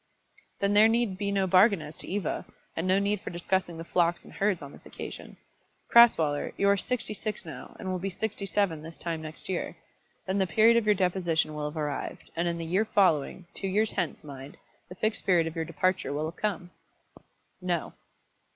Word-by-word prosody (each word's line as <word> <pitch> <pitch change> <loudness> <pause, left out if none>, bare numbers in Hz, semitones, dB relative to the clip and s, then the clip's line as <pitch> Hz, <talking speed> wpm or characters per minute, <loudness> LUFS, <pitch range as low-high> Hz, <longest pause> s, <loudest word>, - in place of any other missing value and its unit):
"Then 200 0 +2
there 210 +2 +7
need 225 -4 +1
be 200 -1 -1
no 195 -1 +2
bargain 190 +2 +5
as 155 0 -8
to - - -6
Eva, 195 -3 -2 0.3
and 165 +3 -2
no 185 +1 +4
need 200 0 0
for - - -6
discussing 175 0 -1
the 165 - -6
flocks 170 0 +1
and - - -13
herds 195 -5 0
on 140 - -9
this - - -14
occasion. - - -8 0.5
Crasweller, 160 -12 +5
you 200 - +2
are 200 - +5
sixty 245 +2 -2
six 215 0 -3
now, - - -9
and 190 - -6
will 185 - -2
be 195 +2 -2
sixty 200 +1 -3
seven 180 -4 +1
this 165 +1 -9
time 165 -2 -3
next 155 0 -7
year. 185 -2 -3 0.5
Then 190 +1 0
the 190 - +2
period 220 +6 +5
of 230 -2 +2
your 210 - +5
deposition 175 -4 +1
will 150 -1 -3
have 155 - -10
arrived, 150 -2 -4
and 170 +1 0
in 170 0 -1
the 165 - -4
year 185 +6 +1
following, 180 -4 +2
two 195 - -4
years 210 +3 +1
hence, 175 - -2
mind, 140 -1 -10 0.3
the 180 - -9
Fixed 215 +3 -1
Period 175 -3 +3
of 165 +1 -5
your 165 -1 -2
departure 185 -4 0
will 150 +2 -1
have 165 +2 -5
come." 195 -4 -2 0.9
"No." 175 -3 -2
185 Hz, 205 wpm, -28 LUFS, 165-200 Hz, 0.9 s, there